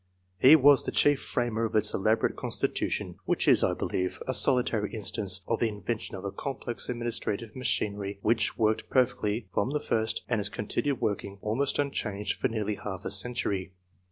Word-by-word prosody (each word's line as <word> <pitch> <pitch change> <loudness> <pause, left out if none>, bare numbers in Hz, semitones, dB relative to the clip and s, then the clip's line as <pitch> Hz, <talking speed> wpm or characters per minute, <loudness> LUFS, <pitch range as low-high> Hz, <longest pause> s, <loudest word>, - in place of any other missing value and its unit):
He 135 +9 +9
was 145 -2 +6
the - - -3
chief 145 -1 +3
framer 115 -2 -1
of 110 - -4
its 105 0 +3
elaborate 110 +3 +1
constitution, - - -2
which - - 0
is, - - +6
I - - +2
believe, 90 0 -2
a 130 - 0
solitary 120 -6 +2
instance 100 -3 -1
of 115 - 0
the 115 - +2
in 105 -3 -9
vention 115 0 -3
of 95 - -8
a 100 - -3
complex 125 +2 -4
administrative 120 -2 -2
machinery 100 -5 -1
which 115 -1 +1
worked 110 -1 +1
perfectly 120 -4 +1
from 110 - 0
the 150 +1 -1
first, 110 -4 -1
and 115 -3 0
has 100 0 -2
continued 135 +6 -2
working, 100 -1 -2
almost 125 +6 0
unchanged, 105 -8 -2
for - - +2
nearly 105 -2 -2
half 95 -2 -6
a - - -2
century. 100 -6 0
110 Hz, 180 wpm, -28 LUFS, 105-125 Hz, -, He